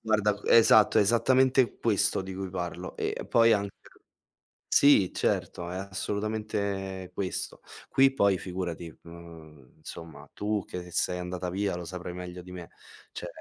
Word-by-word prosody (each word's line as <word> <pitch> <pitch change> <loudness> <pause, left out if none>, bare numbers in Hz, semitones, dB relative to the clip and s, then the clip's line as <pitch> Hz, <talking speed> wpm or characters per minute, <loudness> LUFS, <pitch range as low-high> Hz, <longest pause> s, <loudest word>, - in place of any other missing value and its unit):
Guarda 105 -2 +1
esatto, 110 -2 +6
esattamente 130 +4 +3
questo 105 -4 +1
di 95 0 -7
cui 95 -1 -5
parlo. 90 0 -5
E - - -3
poi 115 -1 +5
anche 100 -2 -1 1.0
sì, 140 -10 +5
certo, 85 0 -1
è 90 - -5
assolutamente 100 -1 -3
questo. 95 -1 -4 0.3
Qui 135 0 +4
poi 100 -7 +2
figurati, 90 -3 -5
mhmm, 80 -5 -14
insomma 80 0 -10
tu 105 -1 -2
che 90 -1 -7
sei 90 - 0
andata 90 0 -4
via 100 +1 -1
lo 90 - -6
saprai 90 +1 -6
meglio 90 0 -7
di 90 - -12
me. 90 -2 -8 0.4
Cioè - - -6
95 Hz, 140 wpm, -28 LUFS, 90-105 Hz, 1.0 s, esatto